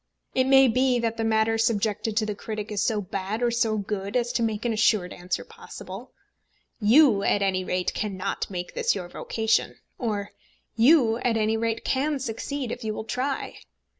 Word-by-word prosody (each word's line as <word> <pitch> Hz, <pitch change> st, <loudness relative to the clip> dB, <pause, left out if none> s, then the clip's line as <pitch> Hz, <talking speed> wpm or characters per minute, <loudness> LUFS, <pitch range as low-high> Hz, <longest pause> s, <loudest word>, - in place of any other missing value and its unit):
It 260 Hz, -, +2 dB
may 270 Hz, 0 st, +7 dB
be 255 Hz, +1 st, +2 dB
that 230 Hz, -1 st, -1 dB
the 225 Hz, -, -1 dB
matter 225 Hz, 0 st, +2 dB
subjected 220 Hz, -1 st, 0 dB
to 220 Hz, -, +2 dB
the 210 Hz, -, -2 dB
critic 215 Hz, +1 st, -6 dB
is 205 Hz, -2 st, -1 dB
so 215 Hz, -3 st, 0 dB
bad 200 Hz, +4 st, -4 dB
or 240 Hz, -, +2 dB
so 230 Hz, -2 st, +1 dB
good 200 Hz, 0 st, -4 dB
as 240 Hz, -1 st, 0 dB
to 235 Hz, -, 0 dB
make 220 Hz, -1 st, -1 dB
an 235 Hz, -, +1 dB
assured 215 Hz, -4 st, +2 dB
answer 175 Hz, 0 st, -4 dB
possible. 195 Hz, +7 st, -10 dB, 0.7 s
"You, 230 Hz, 0 st, +5 dB
at 200 Hz, 0 st, +2 dB
any 185 Hz, -1 st, 0 dB
rate, 180 Hz, 0 st, -1 dB
cannot 195 Hz, -2 st, -3 dB
make 180 Hz, -2 st, -5 dB
this -, -, +1 dB
your 180 Hz, -3 st, -5 dB
vocation;" 220 Hz, +4 st, 0 dB, 0.2 s
or 205 Hz, -4 st, -2 dB, 0.4 s
"You, 230 Hz, -1 st, +5 dB
at 240 Hz, -2 st, 0 dB
any 220 Hz, 0 st, +1 dB
rate, 225 Hz, 0 st, -2 dB
can 285 Hz, +3 st, 0 dB
succeed, 265 Hz, +1 st, -4 dB
if 245 Hz, -, -6 dB
you 215 Hz, -1 st, -2 dB
will -, -, -4 dB
try." 265 Hz, +4 st, -3 dB
220 Hz, 185 wpm, -25 LUFS, 205-240 Hz, 0.7 s, may